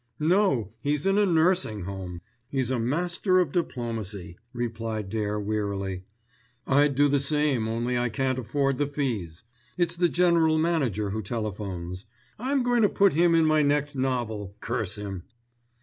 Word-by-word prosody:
"No; 155 - +2
he's 145 +3 0
in 195 +1 +3
a 205 - +3
nursing 165 - +2
home. 90 -2 -6 0.3
He's 130 -2 -1
a 130 - 0
master 175 - +1
of 175 -6 +1
diplomacy," 110 - -3 0.2
replied 115 -4 -4
Dare 105 -1 -1
wearily. 100 -3 -3 0.6
"I'd 140 +1 +3
do 145 +2 +4
the 140 0 +2
same, 140 -5 +2
only 120 +2 -1
I 120 0 +1
can't 130 +3 0
afford 135 +2 -1
the 145 - +2
fees. 115 - -2 0.3
It's 175 -1 +1
the 175 0 +2
general 170 -3 +3
manager 135 - 0
who 110 +2 -2
telephones. 100 -3 -5 0.3
I'm 265 +2 0
going 245 -1 +2
to 205 - +4
put 200 -1 +3
him 170 +2 +4
in 165 -1 +4
my 155 -1 +4
next 145 0 +1
novel, 115 -7 -2
curse 115 -5 -2
him!" 100 -3 -6
130 Hz, 155 wpm, -26 LUFS, 105-160 Hz, 0.6 s, do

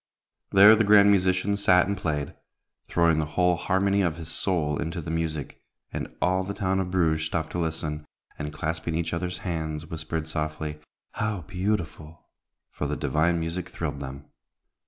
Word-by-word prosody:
There 105 +3 +8
the 110 - +3
grand 100 -1 +7
musician 95 +1 +2
sat 95 -3 +4
and 100 - -1
played, 75 -6 -2 0.5
throwing 85 -2 +3
the 75 - -1
whole 90 -1 +4
harmony 100 +3 +1
of 85 -4 +1
his 80 -2 -7
soul 80 -3 -1
into 80 +2 -3
the 80 0 -5
music, 80 -3 -3 0.3
and - - -4
all 95 +1 +2
the 100 +2 -5
town 95 -2 0
of 95 -1 -2
Bruges 80 -4 +1
stopped 80 -1 -2
to 90 - -3
listen, 80 -2 -3 0.3
and, 75 -1 -4
clasping 80 +1 -3
each 85 0 -1
other's 90 +1 -2
hands, 80 -3 -3
whispered 80 0 -3
softly, 75 -1 -3 0.3
"How 105 -3 -2
beautiful!" 90 -3 -3 0.5
for - - -3
the - - -2
divine 85 +2 +1
music 85 +2 -4
thrilled 75 -4 -4
them. 70 0 -7
85 Hz, 165 wpm, -26 LUFS, 80-95 Hz, 0.5 s, There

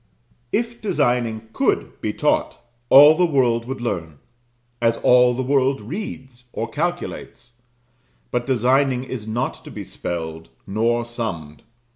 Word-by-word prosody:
If 235 +1 -2
designing 120 - 0
could - - -1
be - - -1
taught, - - 0 0.3
all 145 +3 +9
the 180 - +1
world 120 -6 +1
would 130 +1 -5
learn: 85 -10 -3 0.6
as 115 0 +2
all 125 0 +4
the 130 - -2
world 135 0 +2
reads 125 - -7
or 115 - -3
calculates. 150 -7 -4 0.8
But 120 +1 -1
designing 130 +1 +2
is 125 -4 -6
not 115 +3 -3
to - - -10
be - - -7
spelled, 80 -1 -6 0.2
nor 115 +4 0
summed. 95 -11 -6
120 Hz, 130 wpm, -21 LUFS, 110-135 Hz, 0.8 s, all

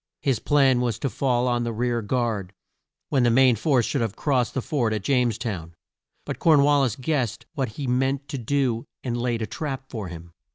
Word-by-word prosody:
His 135 -6 +1
plan 135 -3 +3
was 120 -4 0
to 135 - -2
fall 125 -2 +1
on 120 -1 +1
the 120 - -2
rear 120 +1 -1
guard, 110 -4 -2 0.6
when 135 - +2
the 120 - +4
main 125 +1 +5
force 125 +1 +2
should 140 - -1
have 110 -4 -2
crossed 130 -5 0
the 130 - 0
ford 120 -7 0
at 105 - -4
James 125 -2 +2
town. 85 -8 -5 0.5
But - - -5
Corn 155 -4 +5
wal 145 0 +4
lis 125 -5 +1
guessed 130 -5 -2
what 130 -6 -2
he 140 - -5
meant 135 +2 0
to 140 -3 -4
do 125 -1 0 0.2
and 120 -2 -2
laid 120 -1 -1
a - - 0
trap 135 0 -5
for 110 -6 -4
him. 85 -1 -10
125 Hz, 210 wpm, -24 LUFS, 115-135 Hz, 0.6 s, main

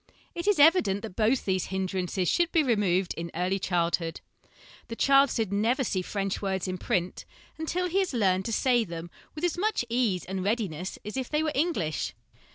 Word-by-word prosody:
It 340 +3 -5
is 415 - +4
evident 285 - +4
that 215 -5 -7
both 230 +4 +2
these 185 -2 0
hindrances 185 -1 -2
should 345 - +2
be 325 -3 +3
removed 195 -7 +1
in 170 +1 -4
early 180 +3 0
childhood. 170 -2 0 0.7
The 230 - -6
child 275 +2 +5
should 220 -5 -1
never 230 +6 +1
see 190 -5 -1
French 195 +1 -3
words 190 -3 -2
in 185 -1 -3
print 180 +1 -1 0.4
until 350 +3 -1
he 365 +3 +1
has 380 -2 0
learned 190 -6 +1
to 230 - -2
say 245 0 +3
them 170 -3 -7 0.2
with 305 - -7
as 350 0 0
much 420 - 0
ease 230 -7 0
and 190 0 -4
readiness 190 -5 -2
as 210 +4 -5
if 260 -2 -3
they 305 +1 +1
were 310 - 0
English. 260 - -1
205 Hz, 190 wpm, -28 LUFS, 185-275 Hz, 0.7 s, child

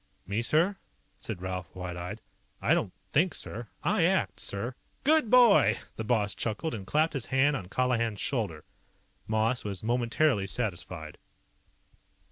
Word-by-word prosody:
"Me, 100 +5 -1
sir?" 165 +11 +2 0.4
said 95 -5 -6
Ralph, 95 -2 -5
wide 90 -1 -5
eyed. 90 +1 -6 0.4
"I - - +3
don't 90 - 0 0.2
think, 155 - +2
sir. 115 +2 -5 0.2
I - - +2
ACT, - - +1
sir!" 110 +6 -3 0.3
"Good 305 -4 +4
boy!" 225 - +6 0.2
The 110 - -4
boss 105 -3 +1
chuckled 115 +8 -2
and 100 -4 -6
clapped 155 +2 +2
his 135 -5 -3
hand 135 +2 +3
on 95 -8 -5
Colihan's 115 -3 0
shoulder. 100 - -2 0.6
Moss 110 +3 +1
was 100 -2 -4
momentarily 120 -1 +2
satisfied. 90 -8 -4
115 Hz, 140 wpm, -29 LUFS, 95-135 Hz, 0.6 s, boy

